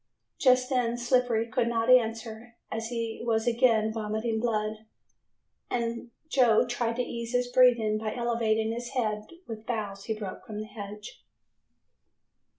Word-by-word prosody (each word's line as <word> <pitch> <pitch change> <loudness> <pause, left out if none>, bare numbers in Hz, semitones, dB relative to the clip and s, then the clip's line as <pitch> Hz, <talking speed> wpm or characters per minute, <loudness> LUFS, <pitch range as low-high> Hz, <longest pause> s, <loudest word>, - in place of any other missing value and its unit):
Just 255 -1 +4
then 240 -2 +1
Slippery 245 -2 +2
could 230 +1 0
not 230 -1 0
answer, 230 -1 +2 0.2
as 225 0 -3
he 230 -1 -4
was 225 -1 +1
again 230 -2 +3
vomiting 220 +1 -2
blood, 215 -1 -2 0.8
and 235 0 -2 0.2
Joe 250 -6 +4
tried 240 -1 -1
to 250 - 0
ease 235 0 -5
his 245 0 +2
breathing 235 -4 +4
by 215 -1 -3
elevating 230 -2 0
his 240 +2 -5
head 215 -4 -1 0.2
with 220 -1 -8
boughs 205 -4 -3
he 220 - -2
broke 200 -3 -6
from 210 -1 -5
the 215 - -4
hedge. 210 -1 -9
230 Hz, 145 wpm, -28 LUFS, 220-240 Hz, 0.8 s, Just